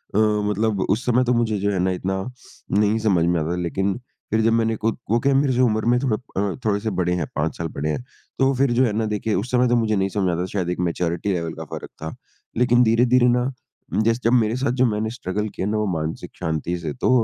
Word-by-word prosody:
अ, - - +3
मतलब 105 -1 +1
उस 110 +5 +1
समय 125 +1 +3
तो 125 - +2
मुझे 115 -3 +1
जो 100 +1 0
है 95 - -1
ना, 95 +1 +2
इतना 95 +1 -2 0.6
नहीं 105 +2 +3
समझ 100 -6 +2
में 85 0 +2
आता 80 +2 -2
था। - - 0
लेकिन 95 +3 -1 0.3
फिर 110 - +2
जब 115 +1 +3
मैंने 115 -1 +2
खुद 110 +1 0
वो 115 - +4
क्या 140 +3 +2
है 135 - +4
मेरी 130 -3 +1
उम्र 110 -3 +2
में 120 +1 +3
थोड़ा 125 -5 +1 0.4
अ, - - -5
थोड़े 100 -1 +2
से 110 +2 -2
बड़े 90 0 +1
हैं 85 - -1
5 80 +2 -1
साल 85 - -2
बड़े 75 -1 -3
हैं। 100 +11 -2 0.4
तो 135 - +4
वो 135 - +2
फिर 135 -1 +2
जो 130 +2 +4
है 115 - 0
ना, 110 +1 0
देखिए 105 +1 -1
उस 105 +7 -2
समय 125 0 +3
तो 120 - +3
मुझे 110 -2 +1
नहीं 95 0 +1
समझ 95 -2 0
आता 90 +2 -1
शायद 90 -4 -1
एक 90 - -2
मैच्योरिटी 85 +2 -1
लेवल 85 -2 -2
का 80 - -7
फ़र्क - - -8
था। 80 +1 -5 0.4
लेकिन 120 0 +4
धीरे-धीरे 120 +2 +4
ना 125 +2 +2 0.5
जैस 115 +2 +2
जब 115 - +3
मेरे 115 -2 +3
साथ 130 -1 0
जो - - +6
मैंने 110 -1 0
स्ट्रगल 105 -2 -3
किया 95 - -2
ना 110 +1 0
वो 105 - 0
मानसिक 80 -3 -3
शांति 80 +2 -2
से 80 -4 -4
तो 65 - -1
105 Hz, 260 wpm, -22 LUFS, 90-120 Hz, 0.6 s, जो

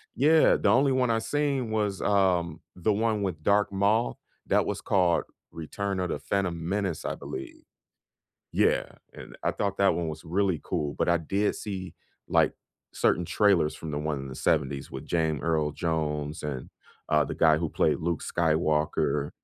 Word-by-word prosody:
Yeah, 155 +4 +5
the 100 - +1
only 135 +5 +4
one 130 -2 +2
I 115 0 +2
seen 140 -3 -1
was, 105 -3 -1
um, 90 -5 +1
the 95 +4 +1
one 110 0 0
with 80 -5 -3
Darth 100 0 +3
Maul, 105 +4 +1 0.3
that - - +3
was - - -3
called 90 -3 +2 0.3
Return 95 +4 -4
of 90 -2 -1
the - - -2
Phantom 85 -4 -2
Menace, 95 -5 -2
I - - -2
believe. 65 - -8 0.9
Yeah, - - +2 0.3
and - - -11
I - - +1
thought 100 -1 -2
that 100 -4 +4
one 85 -1 -2
was 80 +2 -7
really 90 0 0
cool, 75 -1 -2
but - - +1
I 85 0 +4
did 100 +6 0
see, 95 -3 -6 0.3
like, - - +3 0.4
certain 90 - +2
trailers 90 -3 +2
from 80 - -7
the 75 - -2
one 75 -1 -2
in 70 - -7
the 65 - -7
'70s 70 -3 0
with 65 - -6
Jame 80 -4 0
Earl 80 -3 0
Jones 75 -2 -2
and, 65 -4 -5 0.4
uh, 75 -1 +3
the - - -5
guy 80 -1 +4
who 85 -1 -1
played - - +1
Luke 85 -1 -2
Skywalker. 75 -3 0
85 Hz, 175 wpm, -27 LUFS, 75-100 Hz, 0.9 s, Yeah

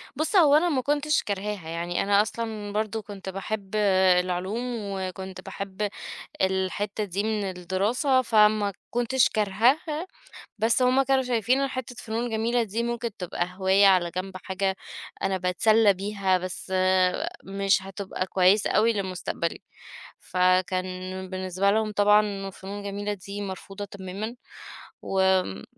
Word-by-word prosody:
بُصّ، 315 +6 -1
هو 300 -6 +7
أنا 345 +3 +4
ما 270 -5 +1
كُنتش 295 +2 +1
كارهاها، 200 -4 -4
يعني 170 +1 -2
أنا 200 +1 +4
أصلًا 215 -1 -4
برضه 220 +1 -1
كُنت 200 -2 -8
باحب 195 +1 -5 0.4
العلوم، 185 +5 -2 0.2
وكُنت 190 -1 -5
باحب 200 +2 -4 0.5
الحتة 190 +3 0
دي 200 +1 -2
من 215 -1 -1
الدراسة، 200 - +1
فما 210 -3 +3 0.2
كُنتش 245 +2 +2
كارهاها، 255 - +1 0.5
بس 230 +4 +2
هُم 255 +2 +4
كانوا 265 0 +2
شايفين 250 +2 +1
إن 275 - +1
حتة 255 -2 -6
فنون 230 +2 -3
جميلة 230 +2 +1
دي 225 +2 -2
ممكن 235 0 -2
تبقى 175 -1 -2
هواية 195 +1 +5
على 180 -3 +4
جنب، 185 0 -4
حاجة 190 0 -1 0.5
أنا 190 -1 +1
باتسلّى 200 +4 +4
بيها، 195 -1 0
بس 185 +1 -6 0.7
مش 195 0 +1
هتبقى 195 -1 -4
كويسة 190 +2 +3
أوي 225 +3 +3
لِمُستقبلي. 185 -4 -3 0.6
فكان 185 +1 0
بالنسبة 185 +1 0
لهُم 215 0 +1
طبعًا 205 -1 +3
فنون 200 +2 -8
جميلة 205 +1 -3
دي 200 +1 -7
مرفوضة 195 +1 -6
تمامًا. 200 +3 -6 0.7
وآمم 190 - +1
200 Hz, 130 wpm, -26 LUFS, 190-220 Hz, 0.7 s, هو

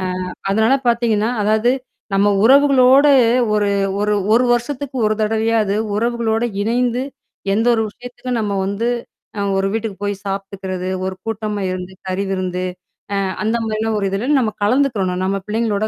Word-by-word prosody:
அ - - -2 0.5
அதனால 220 +5 +3
பாத்தீங்கன்னா, 230 -2 +2
அதாவது 215 +3 +3 0.4
நம்ம 195 +1 +3 0.2
உறவுகளோட 270 +1 +6 0.5
ஒரு 205 -1 +2 0.3
ஒரு 210 0 +1 0.2
1 240 +2 +4
வருஷத்துக்கு 265 +3 -3
1 215 - +2
தடவையாது 220 -1 +1 0.2
உறவுகளோடு 230 0 0 0.2
இணைந்து, 245 +2 0 0.5
எந்த 220 +3 +1
ஒரு 225 - +1
விஷயத்துக்கும் 245 +1 -5
நம்ம 205 -2 -2
வந்து 200 +4 -1 0.5
அ - - 0 0.2
ஒரு 195 0 +1
வீட்டுக்கு 220 -2 -3
போய் 205 0 0
சாப்பி்டுக்கிறது, 195 -2 -4 0.2
ஒரு 190 0 -3
கூட்டமா 215 -2 -3
இருந்து 185 0 -5
கறிவிருந்து, 185 -1 -2 0.6
அ - - -1 0.2
அந்த 220 +2 +1
மாரியான 220 0 -1
ஒரு 200 - -1
இதுல 200 +7 -2
நம்ம 225 -4 0
கலந்துக்கிறணும், 205 -6 +1
நம்ம 195 +1 0
பிள்ளைங்களோட 215 -1 0
215 Hz, 140 wpm, -19 LUFS, 200-235 Hz, 0.6 s, உறவுகளோட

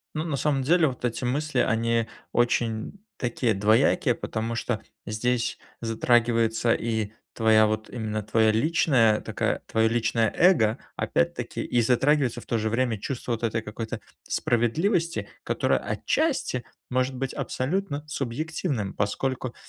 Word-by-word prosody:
Ну, 155 - -1
на 155 -4 -2
самом 135 0 +1
деле, 165 +4 +4
вот 125 -1 -8
эти 125 +1 -1
мысли, 140 +3 -1
они 115 0 +1 0.3
очень 120 - 0 0.2
такие, 120 -2 0
двоякие, 115 - +3
потому 115 0 -3
что 120 -2 -2 0.2
здесь 120 +3 -1 0.2
затрагивается 115 0 +2
и 110 -2 -2 0.2
твоя, 110 -1 +5
вот 110 0 -2
именно 110 -3 -3
твоя 110 +1 +3
личная, 115 -3 +3
такая, - - -1
твое 110 0 +2
личное 115 -1 +1
эго, 130 - +4 0.2
опять-таки, 170 -9 -1
и 120 - +1
затрагивается, 130 +1 +2
в - - -16
то 115 - 0
же 110 0 0
время, 115 -1 0
чувство 120 +3 -4
вот 115 - -3
этой 115 0 0
какой-то 110 +1 -5 0.3
справедливости, 165 - 0 0.2
которое, - - +1
отчасти, 215 - -1 0.3
может 130 +1 0
быть 130 +1 -3
абсолютно 150 +1 -2
субъективным, 140 - -3
поскольку 130 +4 -2
120 Hz, 135 wpm, -26 LUFS, 110-135 Hz, 0.3 s, твоя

